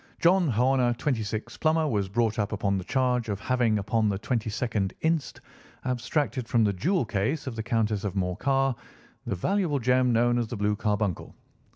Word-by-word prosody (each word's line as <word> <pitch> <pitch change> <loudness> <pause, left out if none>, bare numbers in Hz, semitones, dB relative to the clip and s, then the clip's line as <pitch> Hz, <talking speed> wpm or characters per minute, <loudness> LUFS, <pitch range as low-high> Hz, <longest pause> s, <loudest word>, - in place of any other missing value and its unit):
John 180 +1 +4
Horner, 125 0 +2
26, 115 -6 -3
plumber, 160 0 +2
was 100 -7 -1
brought 110 +1 0
up 105 -1 0
upon 100 -1 0
the - - -5
charge 125 +1 0
of 100 -2 -2
having 120 -2 +1
upon 110 +1 +1
the 100 - -1
22nd 110 -2 -2
inst., 160 -2 -1 0.4
abstracted 130 0 -1
from 115 -1 +3
the 105 -2 +2
jewel 160 - 0
case 110 +8 -1
of 130 -4 -5
the 110 - -3
Countess 110 -3 0
of 100 -2 -3
Morcar 135 +9 +1 0.5
the - - -1
valuable 175 - 0
gem 125 0 +2
known 120 +1 +3
as 120 - -1
the 115 - -5
blue 105 +1 +1
carbuncle. 105 -3 -2
115 Hz, 175 wpm, -27 LUFS, 105-130 Hz, 0.5 s, John